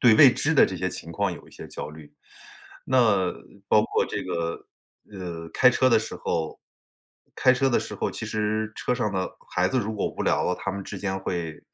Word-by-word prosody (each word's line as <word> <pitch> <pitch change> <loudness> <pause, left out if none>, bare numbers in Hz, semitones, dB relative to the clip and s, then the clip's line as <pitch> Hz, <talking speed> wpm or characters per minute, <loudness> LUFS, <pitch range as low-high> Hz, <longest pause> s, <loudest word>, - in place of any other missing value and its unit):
对 120 -3 +7
未 140 -5 +9
知 155 - +1
的 155 - +6
这 95 - -5
些 90 +1 -1
情 85 - -7
况 100 +2 0
有 - - -10
一 - - -17
些 - - -10
焦 - - -6
虑。 75 -1 -12 0.7
那 110 -8 +3 0.4
包 105 - +5
括 - - +1
这 - - -4
个， 85 0 -3 0.5
呃， 85 -4 -6
开 125 - +6
车 130 +1 +3
的 120 - +5
时 110 - -5
候 80 -1 -2 0.8
开 130 - +5
车 135 +1 +2
的 120 - +3
时 - - -6
候， - - -1
其 - - -6
实 110 0 -1
车 125 - 0
上 105 -4 -1
呢， 95 -1 0 0.3
孩 90 +1 +2
子 130 - +1
如 110 0 -3
果 105 - -1
无 - - -5
聊 - - +2
了， 90 - +1
他 100 - -3
们 100 0 -5
之 100 - -6
间 95 0 -2
会 85 -4 -4
100 Hz, 235 characters per minute, -25 LUFS, 90-120 Hz, 0.8 s, 未